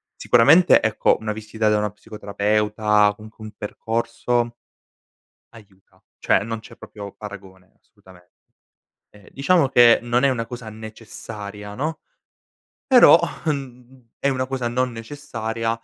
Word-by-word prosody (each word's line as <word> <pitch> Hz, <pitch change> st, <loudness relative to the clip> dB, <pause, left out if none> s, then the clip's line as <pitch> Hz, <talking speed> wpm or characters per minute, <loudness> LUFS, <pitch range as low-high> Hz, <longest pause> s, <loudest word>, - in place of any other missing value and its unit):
Sicuramente, 160 Hz, +10 st, +5 dB
ecco, 110 Hz, -1 st, +1 dB
una 105 Hz, -1 st, -3 dB
visita 110 Hz, 0 st, -2 dB
da 105 Hz, -, +2 dB
una 105 Hz, -1 st, -1 dB
psicoterapeuta, 105 Hz, 0 st, 0 dB
comunque 110 Hz, +1 st, -14 dB
un 110 Hz, -, -9 dB
percorso 115 Hz, +2 st, -2 dB, 1.0 s
aiuta. 100 Hz, -4 st, -20 dB, 0.2 s
Cioè, -, -, +1 dB
non 115 Hz, 0 st, -5 dB
c'è 115 Hz, +1 st, -15 dB
proprio 100 Hz, -2 st, -10 dB
paragone, 95 Hz, -3 st, -12 dB
assolutamen 95 Hz, -4 st, -21 dB, 0.9 s
ehm 105 Hz, -2 st, -19 dB
diciamo 140 Hz, +1 st, +2 dB
che 120 Hz, -1 st, +6 dB
non 120 Hz, +1 st, 0 dB
è 140 Hz, -, +4 dB
una 115 Hz, -3 st, -3 dB
cosa 120 Hz, -3 st, -8 dB
necessaria, 105 Hz, -2 st, -9 dB
no, 155 Hz, +6 st, -3 dB, 0.9 s
però 250 Hz, -, +7 dB, 0.3 s
uhm, 125 Hz, -4 st, -6 dB
è 140 Hz, -, +1 dB
una 130 Hz, -1 st, -1 dB
cosa 130 Hz, -2 st, -3 dB
non 125 Hz, +1 st, -1 dB
necessaria, 115 Hz, -2 st, -5 dB
115 Hz, 125 wpm, -22 LUFS, 105-125 Hz, 1.0 s, però